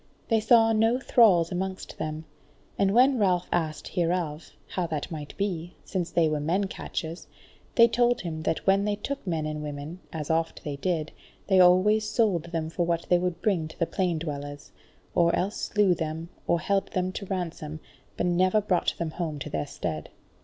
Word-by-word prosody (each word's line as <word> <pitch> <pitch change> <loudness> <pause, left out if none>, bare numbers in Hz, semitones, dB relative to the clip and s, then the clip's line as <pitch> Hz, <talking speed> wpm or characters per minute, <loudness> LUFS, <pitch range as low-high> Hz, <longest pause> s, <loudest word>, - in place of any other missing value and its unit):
They 225 -2 +4
saw 225 +1 +5
no 225 +3 +3
thralls 195 -11 +4
amongst 190 +1 -4
them; 155 +1 -4 0.5
and 195 -1 +2
when 255 +3 +5
Ralph 180 -4 +2
asked 160 -3 -1
hereof, 170 -3 -1 0.2
how 180 -2 -2
that 155 +1 -4
might 150 -3 -7
be, 175 -4 -3
since 180 -3 -2
they 165 -2 +3
were 155 -1 0
men 170 +7 +1
catchers, 170 -2 -5 0.5
they 235 -1 +8
told 240 +1 +2
him 160 -3 -4
that 155 - -1
when 195 +1 +4
they 210 -1 +1
took 275 +3 -5
men 160 -3 -1
and 155 0 -3
women, 150 +3 -6
as 155 -1 -3
oft 165 0 -1
they 145 -2 -4
did, 160 -1 -1 0.3
they 190 -2 +4
always 200 +4 +5
sold 200 -9 +1
them 165 -2 -3
for 175 - 0
what 170 -1 -1
they 180 - +5
would 180 -1 -3
bring 180 -7 +1
to 160 - -13
the 170 - +1
plain 180 -1 -1
dwellers; 145 -2 -6 0.4
or 170 -1 +3
else 200 +4 -1
slew 205 -3 +2
them, 160 0 -4 0.2
or 170 - +3
held 195 +4 0
them 185 0 0
to 195 +1 -6
ransom, 165 -5 -4 0.4
but - - 0
never 185 +4 +3
brought 195 -4 +1
them 165 -2 -3
home 160 -3 -3
to 140 - -6
their 75 -1 -2
stead. 75 -1 -4
175 Hz, 190 wpm, -27 LUFS, 160-195 Hz, 0.5 s, they